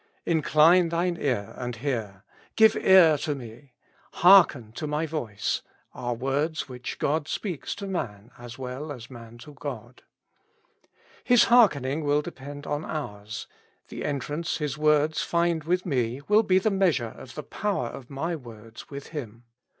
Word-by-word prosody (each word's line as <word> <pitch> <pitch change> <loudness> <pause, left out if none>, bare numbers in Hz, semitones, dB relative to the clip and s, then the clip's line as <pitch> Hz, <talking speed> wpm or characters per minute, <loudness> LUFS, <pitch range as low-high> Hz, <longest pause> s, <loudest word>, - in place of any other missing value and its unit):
Incline 165 +2 +4
thine 170 +1 0
ear, 120 -8 -1
and 125 -1 -4
hear; 110 -6 -4
" - - -27
" - - -35
Give 220 0 +6
ear 170 -6 +6
to 150 0 -2
me;" 125 +1 -11 0.4
''Hearken 170 - +6
to 155 - -4
my 150 +2 -1
voice;" 135 -10 -3 0.3
are 120 -1 -3
words 140 +6 -1
which 125 -2 -7
God 150 +1 0
speaks 180 -5 -4
to 200 - -7
man 115 - -5
as 120 -1 -10
well 130 +3 -6
as 125 -3 -9
man 115 -1 -11
to 150 - -12
God. 130 -4 -8 1.2
His 245 -2 +5
hearkening 155 - +4
will 145 +1 +2
depend 145 -2 -9
on 145 +2 -2
ours; 105 -9 -6 0.4
the - - -6
entrance 150 +3 -2
His 150 -4 -3
words 150 0 +2
find 170 -2 0
with 180 +2 0
me, 125 -5 -1
will 210 +1 +5
be 185 -4 +3
the 210 +3 +2
measure 175 - +1
of 130 - -12
the 150 - -5
power 205 - -2
of 130 -2 -10
my 160 +5 -3
words 115 -5 -12
with 140 -1 -8
Him. 120 -7 -7
145 Hz, 160 wpm, -26 LUFS, 125-165 Hz, 1.2 s, Give